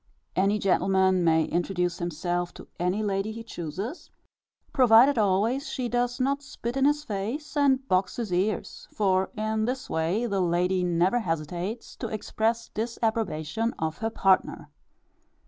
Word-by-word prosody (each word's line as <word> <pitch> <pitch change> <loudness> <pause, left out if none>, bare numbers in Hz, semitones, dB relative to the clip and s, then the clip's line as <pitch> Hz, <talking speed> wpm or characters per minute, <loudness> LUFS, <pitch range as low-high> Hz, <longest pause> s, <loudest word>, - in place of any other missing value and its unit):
Any 200 +3 +2
gentleman 190 -1 +2
may 160 -1 +3
introduce 175 -1 -1
himself 175 +1 -2
to - - -11
any 180 +5 0
lady, 200 +1 -1
he 225 +1 -7
chooses, 195 - -6 0.6
provided 250 0 +6
always 215 +8 +1
she 255 -2 -2
does 245 +1 -1
not 275 +2 +1
spit 240 -3 -6
in 270 0 +2
his 295 +1 +2
face, 230 +9 -4
and 270 -2 +2
box 185 -2 +1
his 225 -6 -3
ears; 195 +4 -2
for, 190 -2 +1
in 215 0 0
this 255 +2 -3
way, 170 +9 0
the 200 -4 0
lady 180 +1 +1
never 180 +6 +2
hesitates 175 +4 -4
to 235 - -4
express 220 +1 -1
disapprobation 225 -3 -2
of 160 0 -3
her 225 - -1
partner. 195 -4 +1
205 Hz, 145 wpm, -27 LUFS, 180-235 Hz, 0.6 s, provided